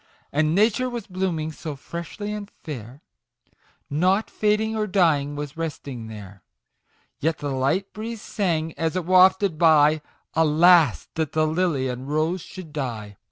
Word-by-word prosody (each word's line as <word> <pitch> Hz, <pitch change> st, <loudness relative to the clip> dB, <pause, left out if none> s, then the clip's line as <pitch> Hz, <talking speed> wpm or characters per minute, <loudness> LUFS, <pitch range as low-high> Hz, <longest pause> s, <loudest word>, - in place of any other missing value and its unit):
And 155 Hz, +2 st, +1 dB
Nature 225 Hz, +5 st, +3 dB
was 240 Hz, -4 st, -5 dB
blooming 180 Hz, -4 st, -2 dB
so 155 Hz, 0 st, -6 dB
freshly 170 Hz, +8 st, -6 dB
and 210 Hz, -1 st, -6 dB
fair, 130 Hz, -2 st, -8 dB, 0.8 s
Nought 185 Hz, +8 st, +1 dB
fading 215 Hz, +1 st, +1 dB
or 215 Hz, -1 st, -1 dB
dying 155 Hz, -7 st, +2 dB
was 145 Hz, -1 st, -5 dB
resting 140 Hz, -7 st, -5 dB
there; 100 Hz, -3 st, -10 dB, 0.8 s
Yet 160 Hz, +1 st, 0 dB
the 145 Hz, -1 st, -4 dB
light 135 Hz, +9 st, 0 dB
breeze 225 Hz, +1 st, -5 dB
sang, 165 Hz, -5 st, -1 dB
as 165 Hz, +1 st, 0 dB
it 185 Hz, -3 st, -1 dB
wafted 185 Hz, -1 st, +4 dB
by, 155 Hz, -2 st, +5 dB, 0.2 s
" -, -, -45 dB
Alas 160 Hz, -1 st, +4 dB
that 160 Hz, -2 st, -2 dB
the 155 Hz, 0 st, +2 dB
Lily 155 Hz, -4 st, 0 dB
and 125 Hz, +2 st, -5 dB
Rose 160 Hz, +4 st, 0 dB
should 175 Hz, -4 st, -10 dB
die 115 Hz, -8 st, -4 dB
160 Hz, 150 wpm, -24 LUFS, 145-185 Hz, 0.8 s, by